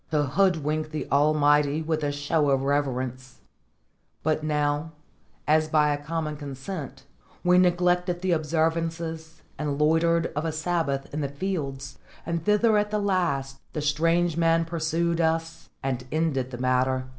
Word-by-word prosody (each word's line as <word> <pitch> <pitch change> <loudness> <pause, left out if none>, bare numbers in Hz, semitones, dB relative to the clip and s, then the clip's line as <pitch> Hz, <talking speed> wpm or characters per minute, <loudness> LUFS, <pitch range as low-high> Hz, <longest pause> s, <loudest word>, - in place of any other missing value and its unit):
to 150 -2 +2
hoodwink 155 -1 +1
the 155 0 -4
Almighty 145 +1 +3
with 155 -1 -1
a 145 - 0
show 145 +1 0
of 135 -1 +2
reverence; 130 -3 -2 0.8
but 155 0 0
now, 150 +1 -1 0.5
as 155 +1 +3
by 150 -1 +3
a 145 0 -5
common 155 -1 -3
consent, 140 0 -7 0.4
we 180 0 +5
neglected 180 0 +2
the 185 - +1
observances 165 0 -1 0.2
and 145 -1 -2
loitered 165 +2 +2
of 150 - -1
a 165 - -1
Sabbath 155 -4 -2
in 150 - -2
the 140 - -2
fields, 140 -5 -4 0.3
and 170 -1 -2
thither 210 +1 +4
at 210 0 -1
the 210 - -1
last 140 -9 -1
the 150 - -2
strange 165 +3 +1
man 165 0 +3
pursued 170 +1 -1
us 165 0 -1
and 130 -2 -2
ended 150 -5 0
the 125 - -7
matter. 130 +1 +1
155 Hz, 145 wpm, -26 LUFS, 145-165 Hz, 0.8 s, we